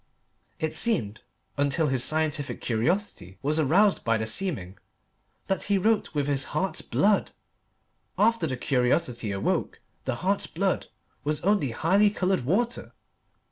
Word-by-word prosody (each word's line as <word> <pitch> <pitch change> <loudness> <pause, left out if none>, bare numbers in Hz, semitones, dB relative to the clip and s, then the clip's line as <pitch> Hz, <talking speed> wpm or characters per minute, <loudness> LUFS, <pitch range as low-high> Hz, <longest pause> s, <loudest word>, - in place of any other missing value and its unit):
It 160 -1 -2
seemed, 140 - 0 0.4
until 140 +3 +1
his 130 -4 +2
scientific 155 -2 0
curiosity 120 - -2
was 150 +3 +1
aroused 185 +8 +3
by 115 0 +2
the 110 - -2
seeming, 110 - -2 0.7
that 190 - -1
he 200 -1 +2
wrote 210 -3 +1
with 145 -1 +1
his 140 -1 +1
heart's 190 +3 -1
blood. 205 0 +2 0.9
After 225 -5 +2
the 130 -3 -3
curiosity 125 -3 0
awoke, 100 0 -1 0.3
the - - -1
heart's 195 +9 -1
blood 190 +2 -1 0.4
was 150 0 -1
only 195 -7 +2
highly 190 - +3
coloured 190 - 0
water. 230 - -1
155 Hz, 135 wpm, -26 LUFS, 125-195 Hz, 0.9 s, aroused